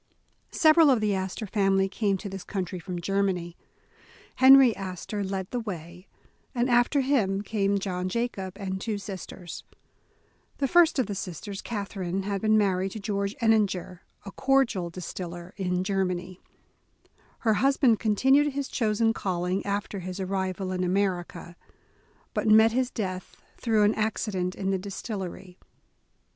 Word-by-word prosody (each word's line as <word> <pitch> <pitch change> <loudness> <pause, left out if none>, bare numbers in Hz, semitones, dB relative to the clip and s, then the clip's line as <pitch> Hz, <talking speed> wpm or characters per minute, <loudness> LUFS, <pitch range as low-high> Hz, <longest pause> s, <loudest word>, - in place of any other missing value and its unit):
SEVERAL 315 -1 +6
of 255 -4 +4
the 210 -1 +1
Astor 190 +3 -3
family 195 -1 +2
came 200 0 0
to 200 - -7
this 195 -1 -7
coun 190 -3 -3
try 180 +1 -7
from 175 +1 -5
Germany. 180 -2 -1 0.8
Henry 265 -2 +8
Astor 195 +2 -5
led 190 -1 -4
the 245 - -1
way, 180 -4 -7 0.5
and 245 +1 +1
after 245 +4 +3
him 210 -8 +1
came 200 -2 0
John 185 -2 -3
Jacob, 195 -4 -3
and 190 -2 -4
two 215 -1 -2
sis 195 -2 -7
ters. 175 -3 -9 0.9
The 275 - 0
first 340 +1 +5
of 260 - +2
the 205 - -4
sisters, 195 +1 -6
Catherine, 195 -4 -4
had 200 -1 -2
been 215 0 +4
mar 195 -3 +2
ried 190 +1 -1
to 220 - -6
George 200 0 -2
Ehninger, 200 -5 +1 0.3
a 195 - -7
cordial 260 -10 +1
distiller 175 +1 -7
in 180 -2 -1
Germany. 185 -2 -2 1.0
Her 220 -2 +3
husband 265 -1 +3
continued 265 +7 +3
his 280 0 -3
chosen 225 -1 +1
calling 180 -2 -2
after 200 0 -2
his 185 +1 -6
ar 190 - -2
rival 190 0 -2
in 185 0 -1
America, 180 -2 -2 0.8
but - - -1
met 220 +1 +7
his 250 +1 0
death 185 -6 -5 0.2
through 220 -3 +2
an 210 +1 +4
accident 200 -4 -2
in 195 -1 -2
the 190 - 0
distillery. 190 -2 -6
195 Hz, 155 wpm, -27 LUFS, 185-220 Hz, 1.0 s, Henry